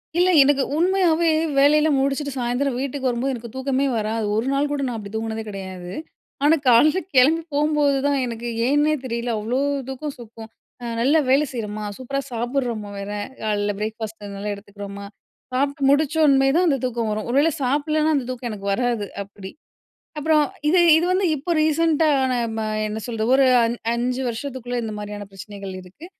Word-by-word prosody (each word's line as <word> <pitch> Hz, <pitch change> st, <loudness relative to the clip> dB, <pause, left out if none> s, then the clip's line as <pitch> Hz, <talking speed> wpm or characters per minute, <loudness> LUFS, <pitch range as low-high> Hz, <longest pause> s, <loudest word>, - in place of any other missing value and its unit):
இல்ல, 355 Hz, +1 st, +4 dB
எனக்கு 275 Hz, 0 st, +4 dB
உண்மையாவே 340 Hz, -1 st, +2 dB, 0.3 s
வேலையெல்லாம் 295 Hz, +1 st, +4 dB
முடிச்சுட்டு 275 Hz, +1 st, -1 dB
சாயந்திரம் 245 Hz, +2 st, -1 dB
வீட்டுக்கு 275 Hz, -1 st, -2 dB
வரும்போது, 245 Hz, +3 st, -1 dB
எனக்கு 235 Hz, 0 st, -8 dB
தூக்கமே 265 Hz, +1 st, 0 dB
வராது. 220 Hz, +1 st, -1 dB
1 220 Hz, +2 st, 0 dB
நாள்கூட 285 Hz, 0 st, 0 dB
நான் 240 Hz, -2 st, -3 dB
அப்டி 205 Hz, -2 st, -8 dB
தூங்குனதே 220 Hz, 0 st, -3 dB
கிடையாது. 190 Hz, -3 st, -7 dB, 0.5 s
ஆனா, 300 Hz, +3 st, +6 dB
காலைல 290 Hz, +9 st, +5 dB, 0.2 s
கெளம்பி 290 Hz, +6 st, +5 dB
போம்போது 295 Hz, -1 st, +2 dB
தான் 285 Hz, -1 st, +1 dB
எனக்கு 235 Hz, 0 st, -5 dB, 0.2 s
ஏன்னே 295 Hz, +3 st, +3 dB
தெரியல. 235 Hz, -1 st, -3 dB
அவ்ளோ 235 Hz, +5 st, -1 dB, 0.3 s
தூக்கம் 275 Hz, +2 st, -5 dB
சொக்கும். 225 Hz, -1 st, -11 dB, 0.3 s
அ -, -, -6 dB, 0.2 s
நல்ல 280 Hz, +6 st, +4 dB
வேலை 275 Hz, +3 st, +4 dB
செய்றோம்மா, 215 Hz, -3 st, -4 dB
சூப்பரா 265 Hz, +2 st, -3 dB
சாப்புட்றோமா 240 Hz, -3 st, -2 dB
வேற! 200 Hz, +1 st, -5 dB, 0.3 s
காலைல 205 Hz, -1 st, 0 dB
பிரேக்ஃபாஸ்ட் 220 Hz, 0 st, -5 dB
நல்லா 205 Hz, +1 st, -4 dB
எடுத்துக்கிறோமா! 200 Hz, 0 st, -9 dB, 0.5 s
சாப்ட்டு 275 Hz, +1 st, 0 dB
முடிச்ச்சோன்மே 285 Hz, -2 st, +4 dB
தான் 355 Hz, +1 st, +3 dB
அந்த 280 Hz, -4 st, +2 dB
தூக்கம் 235 Hz, -3 st, -2 dB
வரும். 215 Hz, 0 st, -3 dB
ஒரு 245 Hz, -, -1 dB
வேள 310 Hz, +3 st, +4 dB
சாப்டலேனா 300 Hz, +4 st, +1 dB
அந்த 270 Hz, -3 st, -1 dB
தூக்கம் 250 Hz, -1 st, -4 dB
எனக்கு 200 Hz, -2 st, -8 dB
வராது 235 Hz, -1 st, 0 dB, 0.2 s
அப்பிடி. 195 Hz, -1 st, -9 dB, 0.7 s
அப்புறம் 305 Hz, 0 st, +3 dB, 0.2 s
இது 355 Hz, +4 st, +4 dB, 0.2 s
இது 335 Hz, -, +1 dB
வந்து 375 Hz, +1 st, +2 dB
இப்போ 300 Hz, +5 st, -4 dB
ரீசென்ட்டா 315 Hz, 0 st, +2 dB, 0.2 s
நான் 235 Hz, -2 st, -1 dB
ம -, -, -1 dB, 0.3 s
என்ன 215 Hz, +1 st, -4 dB
சொல்றது? 225 Hz, -2 st, -2 dB
ஒரு 270 Hz, 0 st, +5 dB, 0.2 s
அன் 230 Hz, +1 st, -1 dB, 0.2 s
5 250 Hz, +2 st, -1 dB
வருஷத்துக்குள்ள 245 Hz, 0 st, -4 dB
இந்த 220 Hz, -1 st, -4 dB
மாரியான 205 Hz, 0 st, -6 dB
பிரச்சனைகள் 195 Hz, 0 st, -8 dB
இருக்கு. 185 Hz, -, -13 dB
250 Hz, 165 wpm, -22 LUFS, 220-290 Hz, 0.7 s, ஆனா